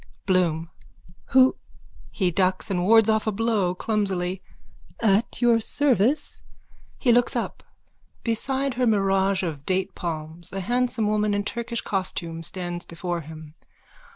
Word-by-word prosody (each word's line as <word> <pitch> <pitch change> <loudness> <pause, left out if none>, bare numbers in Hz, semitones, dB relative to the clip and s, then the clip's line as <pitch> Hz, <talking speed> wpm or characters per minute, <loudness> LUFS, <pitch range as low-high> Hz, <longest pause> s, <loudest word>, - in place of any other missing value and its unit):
BLOOM: 170 -4 +1 0.5
Who? 260 0 +4 0.5
(He 185 -4 0
ducks 185 +3 0
and 180 -2 0
wards 225 +2 +6
off 220 0 +2
a - - +2
blow 205 -4 0
clumsily.) 190 -3 -1 0.6
At 220 +2 +1
your 235 -1 +5
service. 255 +2 +1 0.6
_(He 245 -4 +4
looks 245 +1 +3
up. - - -3 0.6
Beside 265 +4 0
her 250 0 +1
mirage 195 -2 +2
of 155 -5 -4
datepalms 170 -3 -3
a 195 - -3
handsome 245 +2 0
woman 210 0 +1
in 205 - 0
Turkish 235 +2 -4
costume 175 -4 -3
stands 175 0 -4
before 170 0 -4
him. 155 0 -11
195 Hz, 125 wpm, -24 LUFS, 175-230 Hz, 0.6 s, wards